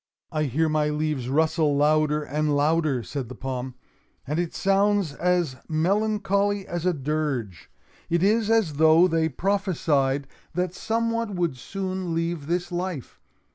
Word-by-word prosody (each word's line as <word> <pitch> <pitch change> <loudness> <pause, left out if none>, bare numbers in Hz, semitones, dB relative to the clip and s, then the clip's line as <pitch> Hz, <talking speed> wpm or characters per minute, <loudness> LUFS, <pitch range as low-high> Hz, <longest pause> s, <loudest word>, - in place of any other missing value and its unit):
"I 155 -2 0
hear 150 +5 +1
my 155 -1 +1
leaves 150 -4 -2
rustle 155 0 +2
louder 150 0 +2
and 150 +1 0
louder," 150 -4 +1
said 130 -3 -5
the 130 - -8
palm, 130 0 -5 0.5
"and 150 +4 -2
it 175 -2 -2
sounds 195 -4 +2
as 175 -5 0
melancholy 200 +3 +1
as 175 -1 -3
a 180 - +3
dirge. 135 - -3 0.4
It 170 +1 +1
is 215 +2 +3
as 215 -11 +2
though 160 +3 +6
they 165 -2 +1
prophesied 150 -6 0 0.3
that 180 0 -1
some 230 +4 -1
one 230 -3 -2
would 170 -6 0
soon 185 +4 -4
leave 165 -3 -2
this 175 +1 -1
life. 175 -6 -4
160 Hz, 145 wpm, -25 LUFS, 145-185 Hz, 0.5 s, though